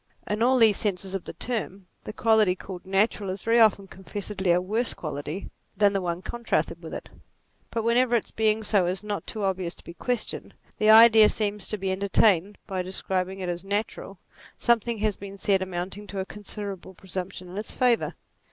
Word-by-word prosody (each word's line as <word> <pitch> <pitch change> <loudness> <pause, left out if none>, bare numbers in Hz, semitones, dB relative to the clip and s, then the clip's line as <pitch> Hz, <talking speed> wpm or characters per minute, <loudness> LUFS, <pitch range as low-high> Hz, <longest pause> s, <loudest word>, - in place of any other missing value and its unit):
In 210 +1 -2
all 255 +2 +4
these 220 -4 +5
senses 195 -2 -2
of 195 - -3
the - - -7
term, 200 -5 -4 0.2
the - - -5
quality 215 -4 +3
called 185 -1 -9
na 195 +2 +4
tural 205 -4 -7
is 185 +1 -5
very 230 +1 +3
often 210 -3 +5
confessedly 195 0 -5
a 175 - +4
worse 215 +6 -1
quality 155 +4 -5 0.3
than 205 -1 +4
the 195 - 0
one 175 0 -3
contrasted 235 -1 -2
with - - -8
it; - - -7 0.6
but 230 -1 -2
whenever 240 +1 +3
its 230 - -1
being 220 0 +1
so 205 -4 +2
is 185 +2 -2
not 210 -1 -4
too 215 - -4
obvious 185 -3 -1
to - - -16
be 170 - -10
questioned, 245 +5 -3 0.2
the 215 - +3
idea 220 -1 +9
seems 210 -2 -1
to 215 - -2
be 190 -1 -2
entertained 195 0 +2
that - - -35
by 190 -3 -2
describing 190 +1 -3
it 185 - -3
as 175 0 -3
natural, 200 -1 -3 0.4
something 235 -1 +2
has 215 -1 0
been 200 0 -9
said 195 -1 +2
amounting 190 +2 -5
to 200 - -7
a 190 - -2
considerable 200 -2 -7
presump 190 +1 -6
tion 185 - -9
in 180 - -9
its 215 - -6
favour. 245 -2 +1
200 Hz, 200 wpm, -26 LUFS, 190-220 Hz, 0.6 s, idea